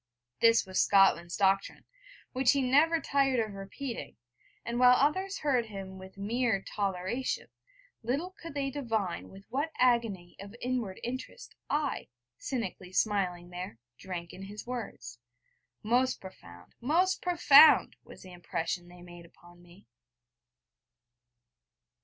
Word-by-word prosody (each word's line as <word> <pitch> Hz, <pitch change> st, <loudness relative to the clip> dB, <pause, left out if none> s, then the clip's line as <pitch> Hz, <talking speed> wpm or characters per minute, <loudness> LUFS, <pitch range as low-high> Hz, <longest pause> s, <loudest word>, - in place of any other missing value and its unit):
This 230 Hz, -1 st, +5 dB
was 185 Hz, 0 st, +1 dB
Scotland's 185 Hz, -3 st, +4 dB
doctrine, 195 Hz, 0 st, +1 dB, 0.5 s
which 260 Hz, -1 st, +3 dB
he 280 Hz, -1 st, +1 dB
never 300 Hz, +6 st, +4 dB
tired 275 Hz, -4 st, +1 dB
of 215 Hz, -2 st, -2 dB
repeating; 200 Hz, +6 st, -7 dB, 0.5 s
and 235 Hz, +1 st, -2 dB
while 250 Hz, 0 st, +7 dB
others 375 Hz, +9 st, +1 dB
heard 255 Hz, -6 st, 0 dB
him 195 Hz, -2 st, -8 dB
with 190 Hz, +1 st, -12 dB
mere 220 Hz, 0 st, 0 dB
toleration, 200 Hz, +5 st, -3 dB, 0.5 s
little 280 Hz, +11 st, -2 dB
could 335 Hz, -5 st, -11 dB
they 275 Hz, -1 st, -1 dB
divine 225 Hz, -10 st, -3 dB
with 195 Hz, +1 st, -14 dB
what 285 Hz, +5 st, -1 dB
agony 230 Hz, -8 st, +1 dB
of 200 Hz, +2 st, -10 dB
inward 245 Hz, -7 st, -3 dB
interest, 255 Hz, -, -6 dB, 0.2 s
I, 295 Hz, -2 st, -1 dB, 0.3 s
cynically 195 Hz, -8 st, -4 dB
smiling 180 Hz, -3 st, 0 dB
there, 180 Hz, -8 st, -7 dB, 0.2 s
drank 175 Hz, -3 st, -6 dB
in 190 Hz, -, -10 dB
his 205 Hz, +2 st, -8 dB
words. 215 Hz, -, -7 dB, 0.6 s
Most 245 Hz, +4 st, +1 dB
profound, 90 Hz, -, -13 dB
most 350 Hz, +9 st, +2 dB
profound, 325 Hz, -4 st, +6 dB
was -, -, -14 dB
the 185 Hz, -1 st, -12 dB
impression 175 Hz, 0 st, -4 dB
they 175 Hz, 0 st, -14 dB
made 175 Hz, -1 st, -12 dB
upon 175 Hz, +1 st, -19 dB
me. 175 Hz, +2 st, -18 dB
215 Hz, 130 wpm, -30 LUFS, 185-260 Hz, 0.6 s, while